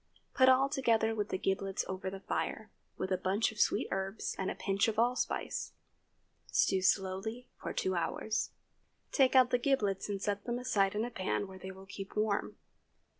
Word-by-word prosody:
Put 260 -1 +6
all 260 +1 +5
together 230 -6 +2
with 210 -2 -2
the - - -1
giblets 195 0 -1
over 190 0 -3
the 190 0 -8
fire, - - -3 0.3
with 190 - -3
a 185 - +1
bunch 195 +5 +1
of 215 - -11
sweet - - +2
herbs 195 +2 -2
and 190 - 0
a - - -3
pinch 195 +2 +1
of 220 -1 -1
allspice. 245 +2 0 0.7
Stew 190 -1 +2
slowly 195 +5 0
for - - -3
two 185 - 0
hours. 180 +5 -1 0.6
Take 265 -2 +4
out 255 -1 +6
the 245 - +3
giblets 215 -8 +1
and 200 -1 -2
set 200 0 -2
them 240 0 -1
aside 205 -6 +1
in 215 +2 0
a 245 - -5
pan 190 0 -1
where 190 0 -11
they 190 - -7
will 190 0 -10
keep 195 0 -8
warm. 210 -1 0
205 Hz, 185 wpm, -33 LUFS, 190-235 Hz, 0.7 s, Put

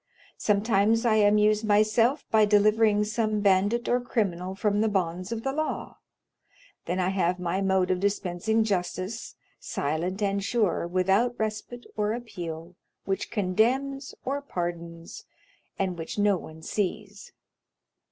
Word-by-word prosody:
Sometimes 210 +2 +2
I 220 -2 +4
amuse 210 +1 +4
myself 215 +6 +3
by 220 -1 +5
delivering 210 0 +4
some 215 0 -1
bandit 205 +4 +2
or 245 0 +2
criminal 190 -6 -2
from 205 +1 +1
the 220 - +2
bonds 185 -1 -2
of 225 -1 -3
the 270 - -1
law. 310 +1 -3 0.9
Then 180 +2 -2
I 180 0 +1
have 180 -2 +1
my 180 +2 -1
mode 190 -1 +2
of 185 - 0
dispensing 200 +2 0
justice, 195 +1 -3 0.2
silent 175 +8 -2
and 200 0 0
sure, 210 -6 0
without 190 +7 +2
respite 220 +3 -4
or 210 0 0
appeal, 175 -8 -7 0.3
which 195 0 -2
condemns 245 +8 0
or 280 +2 -1
pardons, 170 -7 -6 0.5
and 185 -3 -2
which 165 - -6
no 205 -1 +3
one 160 -2 -9
sees. 205 +1 -4
205 Hz, 135 wpm, -27 LUFS, 185-220 Hz, 0.9 s, by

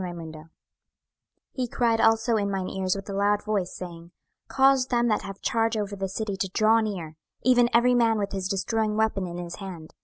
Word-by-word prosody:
26:009:001 165 -3 -7 1.0
He 255 -2 -3
cried 230 -1 +1
also 225 +1 +3
in 200 -2 0
mine 190 -2 -2
ears 190 -1 -1
with 195 0 -7
a 200 - -5
loud 205 +1 +1
voice, 205 -4 -1
saying, 170 -2 -9 0.4
Cause 270 -1 +3
them 240 -1 +1
that 215 - +1
have 195 0 -9
charge 225 -1 0
over 205 -1 -3
the 195 -1 -3
city 205 +1 -3
to 190 - -2
draw 220 +1 +4
near, 180 -8 -4 0.3
even 245 -1 +4
every 245 +1 +4
man 230 -2 +3
with 200 -1 -2
his 190 -1 -3
destroying 215 +2 -1
weapon 215 -4 0
in 175 0 -6
his 175 -1 -6
hand. 180 -6 -9
205 Hz, 195 wpm, -26 LUFS, 185-225 Hz, 1.0 s, draw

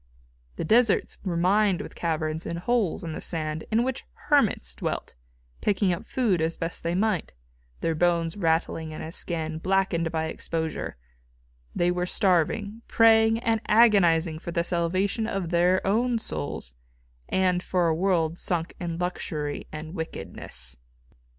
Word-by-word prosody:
The - - -3
deserts 225 +5 +3
were 180 -4 -2
mined 195 +2 +3
with - - -7
caverns 160 -1 -2
and 170 - -3
holes 205 -1 0
in 165 -2 -4
the - - -6
sand 155 -2 -3
in 225 +2 +2
which 260 0 -3 0.3
hermits - - +3
dwelt, 60 - -4 0.5
picking 200 -2 +2
up 170 - -6
food 215 -10 +1
as 160 +1 -1
best 165 +1 -4
they 170 +1 -1
might, 205 -3 0 0.5
their 165 - +1
bones 170 0 +1
rattling 160 -3 0
in - - -6
a 160 - -6
skin 160 -2 -2
blackened 180 -3 +1
by 160 -1 -1
exposure 160 - -4 0.8
they 175 0 +2
were 180 0 -1
starving, 200 +4 +1
praying 225 0 +5
and 225 -2 +1
agonising 175 -8 +4
for 170 - -6
the 170 0 0
salvation 185 +6 0
of 195 -6 -2
their 180 +2 +3
own 235 +5 +2
souls 70 - -4 0.6
and 185 -1 +2
for 180 -2 +1
a 165 - +3
world 170 -1 +1
sunk 175 -2 -1
in 170 -2 -3
luxury 160 -4 -3
and 155 +1 -7
wickedness. 65 - -6
175 Hz, 150 wpm, -26 LUFS, 160-200 Hz, 0.8 s, praying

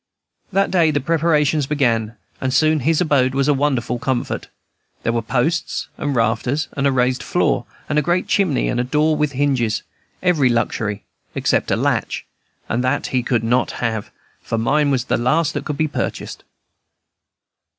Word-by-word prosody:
That 195 +1 +1
day 170 -4 +4
the 145 -1 +1
preparations 150 -1 +1
began, 115 -6 0 0.3
and 130 - 0
soon 155 +4 +3
his 155 +5 +1
abode 135 -6 +2
was 135 0 +2
a 150 - +4
wonder 135 -3 +1
of 120 -1 -3
comfort. 130 -2 -2 0.6
There 115 - 0
were 115 - 0
posts 135 +9 -1
and 145 -2 -2
rafters, 120 +6 0
and 140 0 +1
a - - +3
raised 125 -1 +1
floor, - - 0 0.2
and 150 0 +2
a - - +2
great 175 +5 0
chimney, 185 -9 +1
and 120 - -1
a - - +2
door 150 +4 +2
with 150 -2 0
hinges, 130 -6 0 0.4
every 160 -8 +3
luxury 110 -3 -1 0.3
except - - +1
a - - +2
latch, - - -1 0.4
and 120 +3 -1
that 130 - 0
he 130 - +3
could 120 -2 0
not 125 +3 +1
have, 110 -3 -2 0.3
for 115 - -3
mine 145 +6 +2
was 130 -3 0
the - - +1
last 150 +6 +1
that 145 -1 -4
could 150 - -3
be 155 - +1
purchased. - - -4
135 Hz, 175 wpm, -20 LUFS, 120-150 Hz, 0.6 s, day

